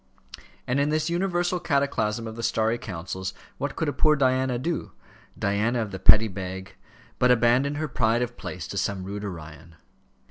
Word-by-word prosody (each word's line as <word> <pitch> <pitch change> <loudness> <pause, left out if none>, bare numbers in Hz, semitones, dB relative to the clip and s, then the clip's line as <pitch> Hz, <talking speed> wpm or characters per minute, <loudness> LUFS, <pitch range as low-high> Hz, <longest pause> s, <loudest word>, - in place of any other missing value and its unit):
And 125 +3 0
in 140 +1 +2
this 155 +2 0
universal 175 0 0
cataclasm 120 -8 0
of 110 0 -6
the 115 - -6
starry 115 +1 +1
councils, 95 -1 -5 0.2
what 145 0 -3
could 160 - -1
a 145 - 0
poor 150 +3 +4
Diana 130 -2 +2
do, 165 +7 -3 0.4
Diana 105 +5 +1
of 110 -3 -2
the 95 - -6
Petty 110 +4 +7
Bag, 95 -1 -6 0.5
but 125 - +4
abandon 125 +4 +3
her 155 +1 -2
pride 120 -2 +1
of 120 - -5
place - - -6
to - - -2
some 100 -2 -2
rude 100 +2 -5
Orion? 80 -4 -8
120 Hz, 175 wpm, -26 LUFS, 100-140 Hz, 0.5 s, Petty